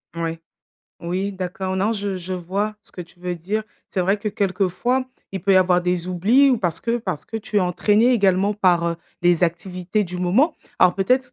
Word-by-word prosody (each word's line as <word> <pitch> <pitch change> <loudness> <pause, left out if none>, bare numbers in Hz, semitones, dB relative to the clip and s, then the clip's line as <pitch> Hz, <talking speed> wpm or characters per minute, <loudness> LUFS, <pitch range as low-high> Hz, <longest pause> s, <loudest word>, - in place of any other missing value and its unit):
Moui. 165 -1 -3 0.6
Oui, 185 +4 -2
d'accord, 185 0 -4
non 200 +4 +1
je 200 -3 -3
je 185 +1 -6
vois 195 +4 -2
ce - - -20
que - - -8
tu 175 0 -12
veux 180 0 -3
dire. 195 +6 -2 0.3
C'est 190 - -1
vrai 190 +3 +2
que 210 - -2
quelquefois, 205 +5 0 0.3
il 190 -3 -4
peut 195 +1 +3
y 190 - +6
avoir 180 -1 +4
des 180 0 -1
oublis 215 +10 +4
ou 255 -3 +3
parce 175 -5 -2
que 235 0 0
parce 185 -9 -4
que 225 - -6
tu 215 -1 -4
es - - +5
entraîné 210 +7 +3
également 200 -2 +2
par, 180 -4 +3
heu, 170 0 -1 0.2
les 175 -1 +3
activités 180 +4 -1
du 180 0 -7
moment. 205 - +2 0.2
Alors 180 -1 +5
peut-être 250 +6 +1
190 Hz, 205 wpm, -22 LUFS, 180-210 Hz, 0.6 s, y